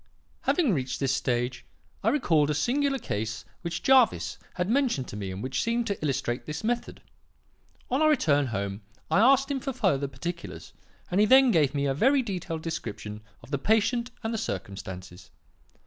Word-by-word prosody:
"Having 310 - +3
reached 130 -4 -2
this 135 -2 +1
stage, 125 -1 -1 0.4
I 220 - +4
recalled 165 - +2
a 150 - +1
singular 275 - +1
case 110 - -4 0.2
which 170 -1 -4
Jervis 220 - +4 0.2
had 180 - -1
mentioned 235 - +1
to - - -7
me 100 -2 -4
and 95 +3 -6
which 130 0 -1
seemed 235 +1 0
to 200 -7 -3
illustrate 130 -4 -1
this 150 +7 -5
method. 235 +2 -2 0.9
On 265 +4 +2
our 310 - +5
return 145 - +3
home 100 -2 -3 0.3
I - - +4
asked 275 +4 +5
him 275 - 0
for 270 +1 -4
further 145 - +1
particulars, 170 +6 -7 0.4
and 180 - +2
he 210 - +5
then 265 +1 +7
gave 150 -6 +2
me 140 0 0
a 135 - +1
very 265 - +3
detailed 175 -6 -4
description 105 -9 -5 0.2
of - - -14
the 140 - 0
patient 225 - +2
and 225 +1 -2
the 225 - -1
circumstances. 95 - -6
165 Hz, 180 wpm, -27 LUFS, -, 0.9 s, then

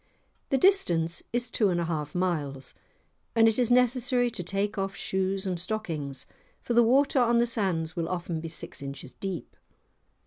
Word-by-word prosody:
The 270 - +3
distance 170 - +3
is 240 +1 -1
two 210 -5 +2
and 175 -1 0
a 170 - 0
half 150 -2 -3
miles, 150 -7 -1 0.6
and 225 -1 +6
it 225 +2 +2
is 245 - +2
necessary 250 0 +3
to 185 - -4
take 195 +4 -2
off 195 -1 -2
shoes 190 +1 -1
and 180 -2 -2
stockings, 160 -9 -3 0.3
for 240 - -3
the 240 - +6
water 265 +4 +4
on 235 -1 +4
the 235 - +4
sands 185 -8 0
will 165 -1 -2
often 175 -2 -3
be 165 - -5
six 160 - -5
inches 140 -1 -7
deep. 190 -4 -6
190 Hz, 175 wpm, -28 LUFS, 165-235 Hz, 0.6 s, and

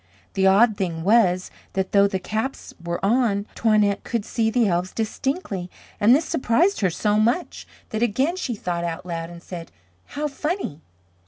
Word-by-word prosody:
The 190 -1 +3
odd 205 +3 +5
thing 170 -5 -2
was, 185 -3 +3 0.2
that 190 -1 -1
though 200 0 +5
the 195 - -2
caps 220 +8 -4
were 170 0 -2
on, 210 -2 +2
Toinette 210 -3 +2
could 230 -3 -2
see 225 -1 0
the 230 -1 +2
elves 180 0 -1
distinctly 220 - -3 0.3
and 225 +5 +6
this 310 +3 +1
surprised 330 +11 +2
her 190 - +3
so 210 +4 +1
much, 240 +11 0 0.2
that 220 - -3
again 260 - +1
she 265 -10 -3
thought 175 -4 -3
out 170 +1 -4
loud 165 -1 -4
and 170 0 -11
said, 170 -2 -8 0.3
"How 300 +1 -3
funny." 295 - -3
210 Hz, 170 wpm, -23 LUFS, 180-240 Hz, 0.3 s, and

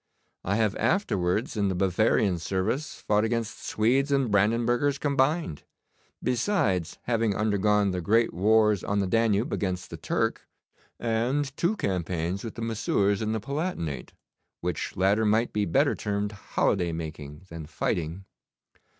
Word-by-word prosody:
I 100 - 0
have 110 -2 +1
afterwards 105 - 0
in 100 -2 +1
the 95 - -1
Bavarian 95 0 +2
service 100 - -2
fought 105 0 +2
against 115 0 -2
Swedes 130 +6 +1
and 135 -5 +2
Brandenburgers 120 +7 +2
combined, 140 - 0 0.6
besides 115 - 0
having 115 -4 +1
undergone 105 -1 +2
the 90 -1 -2
great 115 +6 +2
wars 105 +2 +3
on 100 - -1
the 100 - +2
Danube 110 +2 +1
against 90 -2 -2
the - - -6
Turk, - - -1 0.5
and 125 +5 0
two 175 +7 +1
campaigns 90 - -2
with 115 - -6
the 115 - -5
Messieurs 105 -3 +1
in 110 0 -1
the 110 - -1
Palatinate, 110 - -4 0.5
which 90 -2 -3
latter 100 +4 +3
might 110 +2 +2
be 105 -1 +1
better 85 - +2
termed 105 0 -2
holiday 95 -3 0
making 75 -2 -7
than 80 -2 -8
fighting. 80 +4 -2
105 Hz, 140 wpm, -27 LUFS, 95-115 Hz, 0.6 s, wars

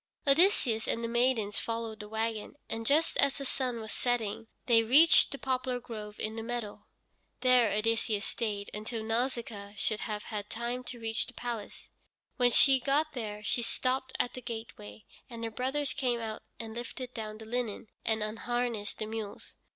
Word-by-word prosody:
Odysseus 275 - +4
and 230 - 0
the - - 0
maidens 235 -3 +2
followed 225 -1 -3
the 210 -1 -8
wagon, 220 +1 -2
and 225 0 -3
just 310 +4 +3
as 280 -1 +3
the 275 - -5
sun 255 -3 -1
was 220 -1 -6
setting 230 -3 -1 0.2
they 230 -2 +6
reached 295 +8 +7
the 275 - -3
poplar 255 -1 -1
grove 215 -3 -8
in 220 +1 -2
the 225 - -3
meadow. 230 -2 -5 0.5
There 250 -3 +6
Odysseus 220 0 +1
stayed 205 -3 -2
until 220 +2 -4
Nausicaa 225 -3 -2
should 215 +2 +1
have 210 -3 -3
had 210 -1 -5
time 240 +2 -3
to 245 -1 -6
reach 225 0 -1
the - - -10
palace. 235 -4 -5 0.5
When 245 -2 +5
she 270 +2 +7
got 295 +4 +1
there, 210 -4 -5
she 240 - +1
stopped 260 +2 -1
at 245 - +1
the 255 - -6
gateway, 220 - -7 0.2
and 230 -2 -7
her 225 - -2
brothers 265 +4 -1
came 245 -3 0
out 220 -1 -4 0.2
and 225 -1 -5
lifted 245 +2 -6
down 215 -2 -5
the 220 - -10
linen, 230 -2 -2 0.2
and 220 -1 +1
unharnessed 225 0 -2
the 215 - -3
mules. 220 -2 -6
230 Hz, 175 wpm, -31 LUFS, 220-250 Hz, 0.5 s, reached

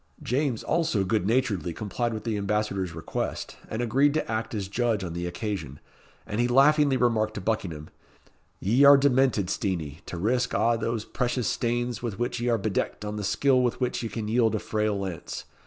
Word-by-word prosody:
James, 130 -2 0
also, 160 - +1
good 95 0 0
naturedly 105 -8 0
complied 110 +5 -2
with 110 -1 -5
the 110 -1 -1
Ambassador's 100 -3 -1
request, 80 - -4
and 110 +2 -2
agreed 140 +5 +3
to 155 - -1
act 110 0 -2
as 100 -3 -3
judge 115 0 0
on 85 -2 -4
the 85 +1 -3
occasion; 85 - -4 0.5
and 105 +3 -1
he 120 - +2
laughingly 140 +2 +4
remarked 110 -3 +1
to - - -3
Buckingham 90 -7 -3 0.7
"Ye 120 +8 +3
are 140 0 +9
demented, 130 -7 +3
Steenie, 85 -6 -2
to 90 - -5
risk 125 +7 0
a' 115 0 +3
those 115 -1 -2
precious 125 -1 -1
stanes 120 -1 -1
with 115 -5 -4
which 120 +1 -2
ye 120 +1 0
are 115 - +3
bedecked 105 -1 -2
on 105 0 -4
the 105 - -4
skill 130 +6 +3
with 125 -1 0
which 125 -1 -1
ye 115 - -3
can 105 +1 -4
yield 115 0 +2
a - - 0
frail 105 -1 -1
lance. 95 -5 -5
110 Hz, 190 wpm, -26 LUFS, 100-125 Hz, 0.7 s, are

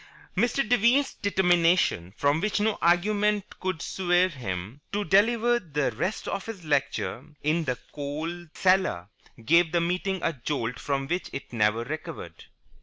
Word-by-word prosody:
Mr. 240 +5 +1
Devine's 245 +4 +3
determination, 175 - +2
from 145 +3 +2
which 210 +1 0
no 215 0 0
argument 205 +4 +2
could 185 -3 -3
swerve 180 -1 +1
him, 105 0 -5
to 205 +1 -1
deliver 235 +4 +3
the 150 -8 -1
rest 205 +3 -3
of 195 +1 -3
his 200 -7 -7
lecture 145 -2 -1 0.2
in 160 +2 +1
the 125 -3 -1
coal 155 +4 -5
cellar 185 - +2 0.4
gave 170 +4 +4
the 170 - +2
meeting 180 +3 -1
a 165 - +1
jolt 125 -3 -3
from 135 -1 -1
which 175 +4 -2
it 140 - -7
never 110 0 +2
recovered. 155 - -7
175 Hz, 145 wpm, -27 LUFS, 145-200 Hz, 0.4 s, gave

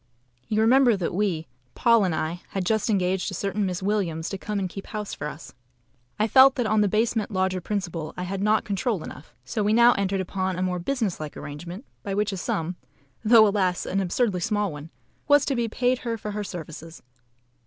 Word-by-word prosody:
You 215 0 +1
remember 245 0 +5
that 175 -3 -2
we 180 -5 0 0.3
(Paul 230 -3 +4
and 175 -4 0
I) 165 +3 -3
had 195 -2 -3
just 220 +2 +1
engaged 190 -2 +1
a 190 - -5
certain 200 +2 -1
Miss 185 0 -4
Williams 185 -6 -1
to 195 - -4
come 210 +1 -3
and 195 -2 -1
keep 195 +2 -9
house 210 -1 -5
for 150 - -4
us. 150 +1 -9 0.6
I 215 - +2
felt 265 +3 +7
that 245 -4 0
on 215 0 +2
the 205 - +3
basement 220 +1 0
lodger 185 -2 0
principle 175 -5 -3
I 180 - -3
had 190 +1 -3
not 210 +1 +2
control 200 -1 -1
enough; 140 - -11
so 170 - -2
we 210 +1 +2
now 235 +1 +7
entered 195 0 -1
upon 190 0 -2
a 180 - -2
more 180 -1 -1
business 220 -1 -1
like 155 -1 -6
arrangement, 170 - -8 0.2
by 195 -1 -3
which 210 0 0
a 195 - -4
sum 175 0 -2 0.5
(though, 220 -1 +7
alas! 190 -3 0
an 195 - -1
absurdly 195 +1 0
small 205 0 0
one) 150 +2 -9 0.4
was 290 -1 +5
to 275 - 0
be 235 -1 0
paid 245 +2 +1
her 230 -2 -3
for 210 0 -5
her 210 0 -3
services. 165 -3 -8
195 Hz, 210 wpm, -25 LUFS, 180-220 Hz, 0.6 s, felt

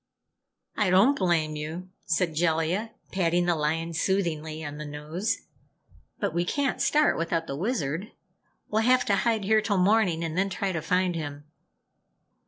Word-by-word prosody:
"I 210 -3 +2
don't 200 +10 +5
blame 170 - +1
you," 160 +5 -6 0.2
said 175 -1 +1
Jellia, 165 +6 0 0.2
patting 175 -2 +1
the 175 - +3
lion 165 +2 -1
soothingly 160 -3 -1
on 145 0 -6
the 150 - -5
nose. 150 +8 -3 0.8
"But - - -1
we 170 +1 +1
can't 275 +8 -1
start 300 - +3
without 165 0 -1
the 135 - -5
Wizard. 180 - -2 0.6
We'll 215 +1 +1
have 250 +2 +4
to 200 - +3
hide 220 0 +1
here 215 +2 +3
till 205 -2 0
morning 185 -3 +3
and 165 -1 -3
then 195 +2 +1
try 195 0 -2
to 165 -3 -2
find 180 +2 +1
him." 145 -3 -5
175 Hz, 160 wpm, -27 LUFS, 160-200 Hz, 0.8 s, don't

